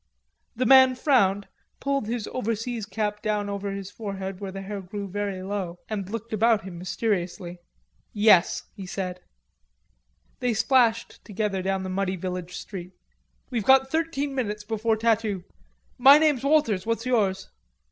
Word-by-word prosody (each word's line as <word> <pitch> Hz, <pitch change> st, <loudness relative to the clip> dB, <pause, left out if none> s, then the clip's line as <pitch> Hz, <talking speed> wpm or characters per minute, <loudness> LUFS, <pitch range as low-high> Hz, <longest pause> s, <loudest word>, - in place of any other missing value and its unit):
The 255 Hz, +2 st, 0 dB
man 260 Hz, 0 st, +7 dB
frowned, 205 Hz, -8 st, +2 dB, 0.3 s
pulled 275 Hz, -5 st, -1 dB
his 230 Hz, -2 st, -3 dB
overseas 230 Hz, -2 st, -3 dB
cap 210 Hz, -1 st, -2 dB
down 210 Hz, -2 st, -1 dB
over 200 Hz, 0 st, -3 dB
his 195 Hz, 0 st, -6 dB
forehead, 195 Hz, -3 st, -6 dB
where 195 Hz, -2 st, -5 dB
the 195 Hz, 0 st, -7 dB
hair 200 Hz, 0 st, -5 dB
grew 200 Hz, +2 st, -6 dB
very 195 Hz, -1 st, -3 dB
low, 190 Hz, -3 st, -4 dB
and 200 Hz, -3 st, -4 dB
looked 230 Hz, +1 st, -6 dB
about 220 Hz, 0 st, +3 dB
him 180 Hz, -2 st, -8 dB
mysteriously. 180 Hz, -2 st, -3 dB, 0.5 s
"Yes," 205 Hz, -4 st, +4 dB
he 195 Hz, -4 st, -9 dB
said. 180 Hz, -1 st, -4 dB, 1.2 s
They 245 Hz, -3 st, 0 dB
splashed 230 Hz, -1 st, +2 dB
together 205 Hz, -2 st, -2 dB
down 190 Hz, 0 st, -1 dB
the 185 Hz, -, -4 dB
muddy 190 Hz, 0 st, -1 dB
village 180 Hz, -1 st, -5 dB
street. 185 Hz, -2 st, -8 dB, 0.6 s
"We've 235 Hz, -4 st, -1 dB
got 265 Hz, +3 st, +5 dB
thirteen 310 Hz, -3 st, -1 dB
minutes 210 Hz, -5 st, -3 dB
before 220 Hz, +1 st, 0 dB
tattoo.... 220 Hz, -4 st, 0 dB, 0.6 s
My 275 Hz, +3 st, +9 dB
name's 300 Hz, -5 st, +2 dB
Walters, 275 Hz, -10 st, +2 dB
what's 230 Hz, +2 st, -2 dB
yours?" 200 Hz, -6 st, 0 dB
210 Hz, 145 wpm, -25 LUFS, 190-235 Hz, 1.2 s, My